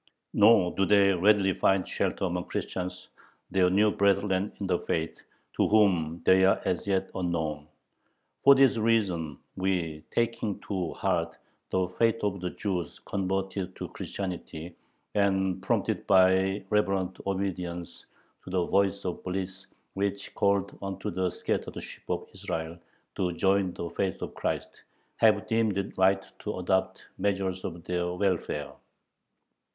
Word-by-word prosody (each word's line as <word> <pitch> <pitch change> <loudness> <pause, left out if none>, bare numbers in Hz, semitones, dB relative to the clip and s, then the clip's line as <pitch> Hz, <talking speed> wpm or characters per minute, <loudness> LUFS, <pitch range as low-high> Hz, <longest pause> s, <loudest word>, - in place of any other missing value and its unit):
Nor 105 -4 +5
do 95 - +2
they 100 -1 +5
readily 95 +1 +4
find 95 +1 +2
shelter - - -1
among 90 -1 -2
Christians, 90 0 -4 0.4
their 90 -1 +4
new 105 +3 +4
brethren 100 0 +2
in 100 - -3
the 90 -2 +1
faith, 80 0 -3 0.3
to - - +3
whom 90 -7 +2
they 95 0 +6
are 95 - +4
as 90 - -1
yet 95 -1 0
unknown.... 80 -5 -2 0.7
For 140 0 +7
this 135 -3 +5
reason 95 -10 +1 0.2
we, 85 -5 -1
taking 115 -3 -1
to 95 -5 -3
heart 85 -3 -1 0.3
the 95 -1 +1
fate 115 +5 +1
of 100 -2 -1
the 90 - -2
Jews 90 -5 -3
converted 95 -1 -2
to - - -6
Christianity, 90 -3 -6 0.4
and 95 -2 +1
prompted - - -1
by 95 +1 +4
reverent 95 -3 +1
obedience 90 -3 -3 0.4
to - - -10
the 90 -1 +1
Voice 100 0 +1
of 90 - -3
Bliss 95 +1 -4 0.3
which 100 0 -2
calleth 100 -1 +1
unto 95 -1 -4
the 90 +1 0
scattered - - -3
sheep - - -11
of - - -2
Israel 80 +1 -4 0.3
to 90 -2 -1
join 95 +1 +2
the 85 - -4
faith 95 +2 -2
of - - -6
Christ, - - -3 0.4
have - - +4
deemed 110 -3 +1
it 100 - -3
right 95 +1 +3
to 105 - -4
adopt 95 +1 0
measures 95 -1 0
for - - -3
their 90 +1 -2
welfare. 90 -6 -1
95 Hz, 140 wpm, -28 LUFS, 90-100 Hz, 0.7 s, For